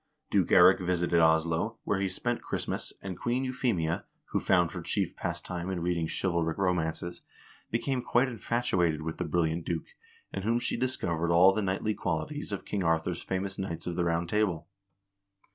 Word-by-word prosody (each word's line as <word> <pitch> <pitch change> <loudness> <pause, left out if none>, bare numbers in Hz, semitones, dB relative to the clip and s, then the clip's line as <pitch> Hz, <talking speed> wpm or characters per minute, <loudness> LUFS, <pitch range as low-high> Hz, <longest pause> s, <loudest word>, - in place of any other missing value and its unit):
Duke - - +3
Eirik - - +7
visited 85 -1 +1
Oslo, 80 +6 +2
where 105 - 0
he 100 - +1
spent 120 +6 -2
Christmas, - - -3
and 95 -3 -5
Queen 125 +2 0
Euphemia, 115 -11 0 0.3
who - - +2
found 90 -2 +3
her 90 - -5
chief 90 +1 -1
pastime 85 +1 -4
in 90 -3 -2
reading 85 -2 0
chivalric 85 -3 0
ro 95 -2 +2
mances, 85 +1 -3 0.5
became 125 +3 -1
quite 120 +2 +2
infatuated 100 -10 0
with 80 0 -4
the 90 - -1
brilliant 80 0 0
duke, 85 -1 -4 0.4
in - - -3
whom 115 +4 +1
she 120 - -1
discovered 85 -10 -1
all 90 +3 +7
the 110 - 0
knightly 100 +2 0
qualities 90 - -3
of 100 - -4
King 100 -2 -2
Arthur's 80 -1 0
famous 95 +1 -3
knights 85 -4 -4
of 90 - -3
the 90 - +1
Round 85 0 0
Table. 90 -6 0
90 Hz, 175 wpm, -29 LUFS, 85-105 Hz, 0.5 s, Eirik